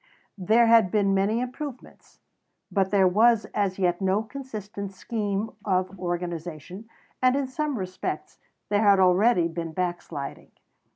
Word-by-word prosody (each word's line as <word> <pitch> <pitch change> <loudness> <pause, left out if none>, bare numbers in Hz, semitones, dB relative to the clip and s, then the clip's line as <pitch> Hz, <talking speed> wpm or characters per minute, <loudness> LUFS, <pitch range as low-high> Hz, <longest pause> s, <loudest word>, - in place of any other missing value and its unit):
There 220 +6 +4
had 225 -4 +5
been 200 0 +2
many 200 +4 +1
improvements; 255 +1 -8 0.5
but 195 -2 +1
there 195 -2 +4
was 220 +4 +4
as 195 -2 0
yet 180 -1 0
no 190 +3 +1
consistent 215 -6 -7
scheme 205 +1 -3
of 185 -1 -1
organization, 175 +2 -5 0.3
and 255 0 +4
in 280 -1 0
some 290 +1 -3
respects 185 -2 -5 0.3
there 205 0 +2
had 200 -2 +5
already 185 0 +4
been 165 -1 -5
backsliding. 175 -5 -4
195 Hz, 130 wpm, -26 LUFS, 180-225 Hz, 0.5 s, had